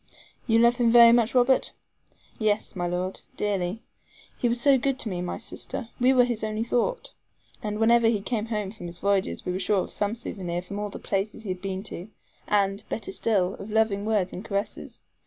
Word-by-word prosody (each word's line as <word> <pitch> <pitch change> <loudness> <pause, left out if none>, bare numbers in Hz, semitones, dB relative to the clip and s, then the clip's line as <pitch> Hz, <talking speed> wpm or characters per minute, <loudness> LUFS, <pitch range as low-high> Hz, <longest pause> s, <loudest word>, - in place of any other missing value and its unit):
"You 225 -1 +4
love 235 +1 +5
him 240 -2 +3
very 235 0 +9
much, 235 0 +3
Robert?" 255 +1 +3 0.7
"Yes, 215 -1 0
my 175 -1 -1
Lord, 180 +2 -3 0.2
dearly. 200 +1 -1 0.5
He 240 - 0
was 235 +1 0
so 280 +2 +5
good 270 +1 0
to 230 - -4
me 180 -2 -3
and 180 - -3
my - - -3
sister. 235 -4 -6
We 250 +1 +5
were 255 -2 +6
his 240 -3 -2
only 215 +1 -1
thought: - - -1 0.5
and 210 0 -3
whenever 230 +1 +4
he 225 -2 +2
came 220 +2 -2
home 210 -4 -2
from 200 -5 -8
his 170 0 -8
voyages, 200 +1 0
we 180 - -1
were 185 - -2
sure 195 +1 +2
of - - -9
some 205 +2 -1
SOUVENIR 180 -6 -3
from 200 +2 -6
all 210 0 -3
the - - -8
places 210 +3 -3
he 205 - -6
had 185 0 -3
been 190 0 -4
to; 195 -2 -8 0.4
and, 200 0 +1
better 365 +12 -4
still, 195 - +1
of 200 - -8
loving 215 -2 +1
words 210 -4 0
and 185 - -6
caresses. 200 -1 -4
210 Hz, 210 wpm, -26 LUFS, 195-235 Hz, 0.7 s, very